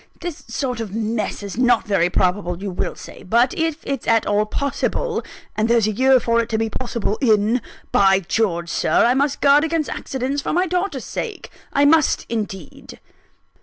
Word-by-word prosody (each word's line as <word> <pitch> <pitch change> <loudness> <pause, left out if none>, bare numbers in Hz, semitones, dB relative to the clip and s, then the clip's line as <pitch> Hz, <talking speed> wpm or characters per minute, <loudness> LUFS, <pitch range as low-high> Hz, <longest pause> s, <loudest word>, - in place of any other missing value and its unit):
This 345 -3 -6
sort 250 0 -3
of 215 -3 -5
mess 220 -2 -2
is 200 +3 -6
not 245 -2 +3
very 195 -5 +2
probable, 180 -1 0
you 200 0 -4
will 180 - -3
say; - - -11
but 235 +6 +2
if 325 -2 -1
it's 275 -3 -4
at 225 -1 +3
all 210 +1 +1
possible 285 - -2 0.3
and 220 +1 0
there's 235 -2 +4
a 215 - +1
year 260 +4 +4
for 235 0 +1
it 230 - -5
to 220 - 0
be 225 0 -1
possible 235 -4 -3
in 220 0 +3 0.3
by 195 -1 +4
George, 170 -3 -1
Sir, - - +2
I 240 - +4
must 280 +1 0
guard 285 +1 +5
against 320 -1 -1
accidents, 265 +2 -3
for - - -3
my 360 +3 +2
daughter's 360 -6 -2
sake 440 -4 -6 0.2
I 285 - +3
must 310 0 +3
indeed!" 200 -8 -6
235 Hz, 185 wpm, -21 LUFS, 210-280 Hz, 0.3 s, guard